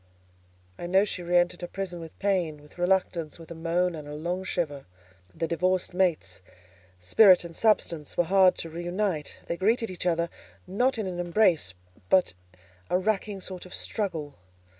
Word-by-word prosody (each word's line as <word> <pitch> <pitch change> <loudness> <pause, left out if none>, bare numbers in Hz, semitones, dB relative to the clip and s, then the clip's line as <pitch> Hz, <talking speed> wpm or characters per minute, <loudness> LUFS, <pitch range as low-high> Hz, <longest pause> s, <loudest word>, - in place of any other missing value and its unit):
I 175 - -4
know 190 +3 +4
she 190 - -4
re 175 0 +2
entered 175 0 +1
her 175 - -4
prison 180 -1 -5
with 165 -1 -10
pain, 180 -7 0
with 150 +4 -18
reluctance, 175 -4 0
with 165 0 -13
a - - -3
moan 170 +2 0
and 155 -2 -8
a 150 - -6
long 175 +4 -3
shiver. 150 - -3 0.4
The 165 - -3
divorced 180 +2 0
mates, 165 - 0 0.6
Spirit 180 - +6
and 170 -1 -9
Substance, 170 -8 +1
were 175 - +4
hard 185 +1 +4
to 165 - -5
re 170 +2 -6
unite: 175 -3 -2
they 170 - -3
greeted 225 +3 +1
each 180 0 -3
other, 170 0 +1 0.4
not 245 +7 +1
in 220 - -2
an 180 -2 -4
embrace, 175 - +2 0.3
but 185 - +4 0.6
a - - +3
racking 200 0 -1
sort 185 -1 -6
of 185 - -8
struggle. 165 -9 -3
175 Hz, 175 wpm, -27 LUFS, 165-190 Hz, 0.6 s, Spirit